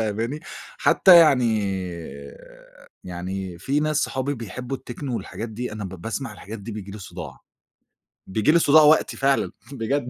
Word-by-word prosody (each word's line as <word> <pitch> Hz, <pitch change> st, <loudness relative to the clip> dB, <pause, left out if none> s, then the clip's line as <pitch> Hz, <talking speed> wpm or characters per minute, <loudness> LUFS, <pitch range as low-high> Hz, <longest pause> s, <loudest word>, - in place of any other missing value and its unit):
فاهماني؟ 115 Hz, +7 st, -2 dB, 0.4 s
حتى 185 Hz, -, +7 dB
يعني، 125 Hz, -9 st, +5 dB, 1.4 s
يعني 90 Hz, 0 st, -5 dB
في 140 Hz, -, 0 dB
ناس 155 Hz, 0 st, 0 dB
صحابي 135 Hz, +2 st, -1 dB
بيحبوا 125 Hz, +3 st, -6 dB
الTechno 130 Hz, +2 st, -7 dB
والحاجات 115 Hz, 0 st, -4 dB
دي، 115 Hz, +2 st, -5 dB
أنا 105 Hz, -1 st, -5 dB
ب -, -, -4 dB
باسمَع 115 Hz, +4 st, -4 dB
الحاجات 105 Hz, +2 st, -9 dB
دي 105 Hz, +3 st, -7 dB
بييجي 105 Hz, -2 st, -7 dB
لي 105 Hz, -, -8 dB
صداع. 90 Hz, -4 st, -9 dB, 0.9 s
بييجي 110 Hz, +9 st, +2 dB
لي 170 Hz, -, +5 dB
صداع 155 Hz, 0 st, +6 dB
وقتي 150 Hz, +1 st, +4 dB
فعلًا 135 Hz, 0 st, +1 dB, 0.2 s
بجد. 130 Hz, +1 st, -2 dB
115 Hz, 150 wpm, -23 LUFS, 105-140 Hz, 1.4 s, حتى